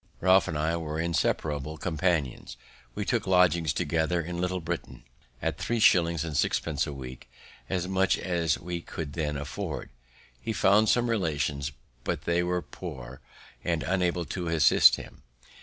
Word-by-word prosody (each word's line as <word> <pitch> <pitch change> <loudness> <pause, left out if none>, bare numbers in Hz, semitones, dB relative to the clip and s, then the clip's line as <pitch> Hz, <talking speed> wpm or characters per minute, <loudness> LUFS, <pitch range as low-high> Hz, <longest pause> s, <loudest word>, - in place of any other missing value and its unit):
Ralph 95 +1 +5
and 80 - -2
I 80 +2 0
were 80 -1 -4
inseparable 80 -2 -1
companions. 80 -8 -1 0.4
We - - -2
took - - 0
lodgings 90 -3 +4
together 85 +1 0
in 85 +1 -4
Little 90 0 -1
Britain 85 0 -5 0.4
at - - -1
three 120 -1 -1
shillings 85 -6 +4
and 80 -2 -5
sixpence 75 +1 0
a - - -4
week 65 -3 -9 0.4
as 90 -2 -1
much 95 0 +2
as 85 -4 0
we 85 -1 -5
could 80 -4 -6
then 75 -3 -2
afford. 75 0 -5 0.5
He 110 - -3
found 100 +2 +4
some 120 0 +3
relations, 75 - -1 0.3
but - - -2
they 85 +1 +1
were 90 0 -1
poor, 65 -7 -9 0.4
and 85 -3 0
unable 90 -2 0
to 90 0 -4
assist 80 -3 +6
him. - - -11
85 Hz, 155 wpm, -28 LUFS, 75-90 Hz, 0.5 s, assist